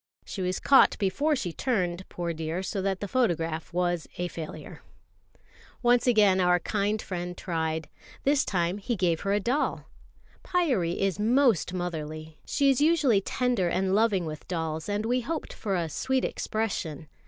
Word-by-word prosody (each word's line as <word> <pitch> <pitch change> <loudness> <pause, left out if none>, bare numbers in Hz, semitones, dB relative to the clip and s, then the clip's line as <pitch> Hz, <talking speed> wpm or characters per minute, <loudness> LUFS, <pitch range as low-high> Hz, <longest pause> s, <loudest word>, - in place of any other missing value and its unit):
She 195 - -5
was 180 0 -1
caught 275 - +5
before 280 +10 +1
she 180 -11 -3
turned, 185 -7 -1
poor 170 -1 -3
dear, 160 +3 -3
so 195 +1 -2
that 195 +1 -2
photograph 165 -11 0
was 175 -2 0
a 180 0 -2
failure. 160 -3 -8 1.0
Once 240 +1 +4
again 205 -5 +5
our 180 -1 +4
kind 205 +3 -1
friend 180 -3 -5
tried. 160 -2 -2 0.4
This 285 +1 +3
time 180 +1 -1
he 235 +4 -2
gave 175 -4 +1
her 200 - -1
a 205 - +3
doll. 245 +8 -1 0.6
Pyârie 250 - +1
is 195 -1 0
most 235 - +3
motherly. 155 -3 -5
She 280 -1 +3
is 270 - +1
usually 295 -10 +4
tender 245 -3 0
and 190 +2 0
loving 205 -4 +2
with 155 -1 -7
dolls, 160 -1 -3
and 205 +1 -1
we 250 +2 +1
hoped 315 +6 -4
for 200 -3 -2
a 170 -2 0
sweet 260 - 0
expression. 170 -9 -3
190 Hz, 160 wpm, -27 LUFS, 170-235 Hz, 1.0 s, caught